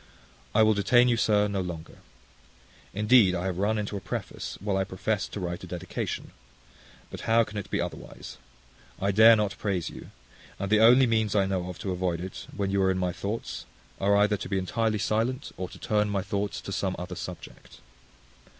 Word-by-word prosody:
I 110 Hz, -, +6 dB
will 110 Hz, 0 st, +5 dB
detain 120 Hz, +4 st, +4 dB
you, 120 Hz, -, +3 dB
sir, 105 Hz, -2 st, +3 dB
no 100 Hz, -2 st, -1 dB
longer. 85 Hz, -3 st, -7 dB, 0.9 s
Indeed 105 Hz, -2 st, +4 dB
I 90 Hz, +1 st, -3 dB
have 95 Hz, -1 st, -2 dB
run 105 Hz, +2 st, +1 dB
into 105 Hz, 0 st, -3 dB
a -, -, -2 dB
preface, -, -, -5 dB
while 100 Hz, 0 st, -1 dB
I 95 Hz, -, +2 dB
professed 100 Hz, +2 st, -2 dB
to -, -, -4 dB
write 85 Hz, -1 st, -4 dB
a -, -, -7 dB
dedication. 90 Hz, +1 st, -5 dB, 0.8 s
But -, -, -6 dB
how 115 Hz, +1 st, +5 dB
can 105 Hz, -, -10 dB
it 100 Hz, -, -8 dB
be -, -, -1 dB
otherwise? -, -, -6 dB, 0.6 s
I 100 Hz, +1 st, +1 dB
dare 110 Hz, +3 st, +8 dB
not 105 Hz, -3 st, -1 dB
praise 95 Hz, -5 st, -1 dB
you; -, -, -10 dB, 0.5 s
and 100 Hz, +1 st, -4 dB
the 105 Hz, -, +5 dB
only 125 Hz, +4 st, +7 dB
means 110 Hz, -3 st, +1 dB
I 100 Hz, -2 st, +4 dB
know 95 Hz, -2 st, -2 dB
of 90 Hz, -, -7 dB
to 95 Hz, -, -4 dB
avoid 90 Hz, -2 st, -1 dB
it, 95 Hz, +2 st, -7 dB
when 100 Hz, -1 st, -1 dB
you 100 Hz, 0 st, +2 dB
are 95 Hz, -, +3 dB
in 95 Hz, -, +1 dB
my 90 Hz, -1 st, 0 dB
thoughts, 100 Hz, +6 st, -5 dB, 0.3 s
are 100 Hz, +1 st, +3 dB
either 105 Hz, 0 st, +3 dB
to -, -, -7 dB
be 95 Hz, -, 0 dB
entirely 110 Hz, +4 st, 0 dB
silent, 115 Hz, +7 st, -1 dB
or 95 Hz, 0 st, -5 dB
to -, -, -12 dB
turn 105 Hz, -1 st, 0 dB
my 100 Hz, -2 st, -1 dB
thoughts 100 Hz, 0 st, -3 dB
to -, -, -7 dB
some 95 Hz, -1 st, -1 dB
other 90 Hz, +1 st, -6 dB
subject. 90 Hz, 0 st, -9 dB
100 Hz, 205 wpm, -27 LUFS, 95-110 Hz, 0.9 s, dare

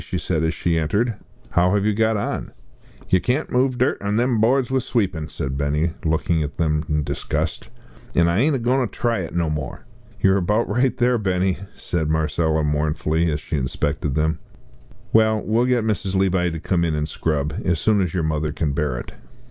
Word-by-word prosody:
she -, -, -4 dB
said 80 Hz, -, -1 dB
as 80 Hz, -, +2 dB
she 85 Hz, -1 st, 0 dB
entered, 105 Hz, +10 st, +1 dB, 0.4 s
"how 90 Hz, +3 st, +3 dB
have 100 Hz, 0 st, +1 dB
you 105 Hz, -, +2 dB
got 110 Hz, +1 st, +2 dB
on?" 100 Hz, -, -3 dB, 0.6 s
"Yer 95 Hz, -, +4 dB
can't 125 Hz, -, -1 dB
move 130 Hz, +1 st, +2 dB
the -, -, -8 dB
dirt 130 Hz, +3 st, +1 dB
on 100 Hz, +1 st, -1 dB
them 120 Hz, -1 st, +2 dB
boards 130 Hz, +3 st, +2 dB
with 130 Hz, -1 st, +2 dB
sweepin'," 95 Hz, -11 st, -1 dB
said 65 Hz, 0 st, -4 dB
Benny, 75 Hz, +4 st, +1 dB
looking 80 Hz, +1 st, +1 dB
at 75 Hz, 0 st, -4 dB
them 75 Hz, -2 st, +1 dB
with 75 Hz, -2 st, 0 dB
disgust; -, -, -3 dB, 0.5 s
"an' 85 Hz, 0 st, +4 dB
I 85 Hz, +4 st, +2 dB
ain't 145 Hz, +4 st, +3 dB
a -, -, +1 dB
goin' 125 Hz, +2 st, +1 dB
to 125 Hz, -, +1 dB
try 115 Hz, 0 st, -1 dB
it 85 Hz, -2 st, -5 dB
no 85 Hz, -2 st, +1 dB
more." 75 Hz, -3 st, -4 dB, 0.3 s
"You're 95 Hz, 0 st, +4 dB
about 105 Hz, +5 st, +1 dB
right 125 Hz, +3 st, +1 dB
there, 125 Hz, -1 st, +2 dB
Benny," 95 Hz, -2 st, 0 dB, 0.2 s
said 80 Hz, -3 st, -2 dB
Marcella, 80 Hz, 0 st, +1 dB
mournfully, 75 Hz, +2 st, 0 dB
as 75 Hz, -1 st, -2 dB
she 75 Hz, -, -3 dB
inspected 70 Hz, +1 st, -1 dB
them; 80 Hz, +1 st, +1 dB, 0.7 s
"well, 110 Hz, -1 st, +4 dB
we'll 115 Hz, +3 st, +1 dB
get 125 Hz, -2 st, +2 dB
Mrs. 100 Hz, -3 st, -1 dB
Levi 95 Hz, -2 st, +2 dB
to 80 Hz, -1 st, -5 dB
come 85 Hz, +1 st, 0 dB
in 80 Hz, -2 st, 0 dB
and 75 Hz, 0 st, -1 dB
scrub 75 Hz, -1 st, -1 dB
as 90 Hz, -4 st, +1 dB
soon 105 Hz, +2 st, +3 dB
as 90 Hz, -4 st, 0 dB
your 90 Hz, -2 st, -1 dB
mother 75 Hz, -1 st, -1 dB
can 75 Hz, -1 st, -1 dB
bear 75 Hz, -4 st, -1 dB
it." -, -, -7 dB
90 Hz, 205 wpm, -22 LUFS, 80-110 Hz, 0.7 s, Yer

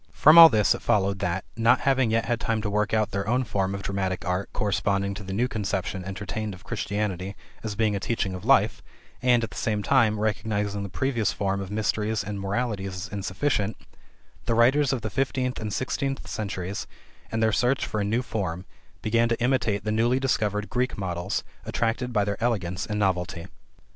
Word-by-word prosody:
From 155 Hz, +2 st, +6 dB
all 165 Hz, -1 st, +12 dB
this 105 Hz, -4 st, +3 dB
it -, -, -6 dB
followed 100 Hz, -1 st, +1 dB
that, 90 Hz, +2 st, -2 dB
not 115 Hz, +2 st, +4 dB
having 130 Hz, -3 st, +2 dB
yet 115 Hz, +1 st, +1 dB
had 120 Hz, 0 st, 0 dB
time 115 Hz, 0 st, 0 dB
to 105 Hz, -, -2 dB
work 105 Hz, +1 st, +1 dB
out 110 Hz, -2 st, +1 dB
their 100 Hz, 0 st, -2 dB
own 125 Hz, +3 st, +2 dB
form 100 Hz, -4 st, -1 dB
of 100 Hz, -, -6 dB
dramatic 95 Hz, -2 st, -2 dB
art 90 Hz, +2 st, -1 dB
corresponding 100 Hz, -1 st, 0 dB
to 100 Hz, -, -7 dB
the 95 Hz, -, -7 dB
new 115 Hz, +6 st, +1 dB
conception 95 Hz, -4 st, -3 dB
entertained 100 Hz, +2 st, -4 dB
of 90 Hz, -, -16 dB
Christianity 100 Hz, -3 st, -3 dB, 0.3 s
as 110 Hz, -2 st, -3 dB
being 105 Hz, -1 st, +1 dB
a -, -, -1 dB
teaching 100 Hz, -2 st, -1 dB
of 90 Hz, -, -7 dB
life, -, -, +3 dB, 0.4 s
and, 120 Hz, -2 st, +4 dB
at 110 Hz, -, -4 dB
the -, -, -9 dB
same 105 Hz, -2 st, -1 dB
time, 110 Hz, -5 st, +3 dB
recognizing 105 Hz, -1 st, -1 dB
the 100 Hz, -, -5 dB
previous 120 Hz, -1 st, 0 dB
form 100 Hz, 0 st, -1 dB
of 95 Hz, -, -6 dB
Mysteries 105 Hz, +1 st, -1 dB
and 105 Hz, -1 st, -5 dB
Moralities 100 Hz, -1 st, -2 dB
as 90 Hz, -, -5 dB
insufficient, 100 Hz, +2 st, -1 dB, 0.7 s
the 115 Hz, -, +2 dB
writers 135 Hz, +4 st, +4 dB
of 125 Hz, -4 st, -2 dB
the 110 Hz, -, -3 dB
fifteenth 130 Hz, -1 st, -1 dB
and 110 Hz, -1 st, -4 dB
sixteenth 135 Hz, +4 st, -2 dB
centuries, 100 Hz, -1 st, -4 dB, 0.4 s
in 110 Hz, -, -1 dB
their 110 Hz, -1 st, +3 dB
search 125 Hz, +5 st, +1 dB
for 105 Hz, -, -3 dB
a -, -, +1 dB
new 115 Hz, +5 st, 0 dB
form, 90 Hz, -6 st, -3 dB, 0.4 s
began 115 Hz, +2 st, +2 dB
to 115 Hz, -, 0 dB
imitate 120 Hz, -5 st, +1 dB
the 105 Hz, -, -1 dB
newly 120 Hz, +4 st, +2 dB
discovered 105 Hz, -6 st, 0 dB
Greek 125 Hz, +5 st, -1 dB
models, 90 Hz, -3 st, -2 dB, 0.2 s
attracted 120 Hz, +2 st, -1 dB
by 105 Hz, -3 st, +2 dB
their 100 Hz, +2 st, -3 dB
elegance 95 Hz, -6 st, -1 dB
and 105 Hz, -, -2 dB
novelty. 90 Hz, -4 st, -1 dB
105 Hz, 195 wpm, -26 LUFS, 100-115 Hz, 0.7 s, all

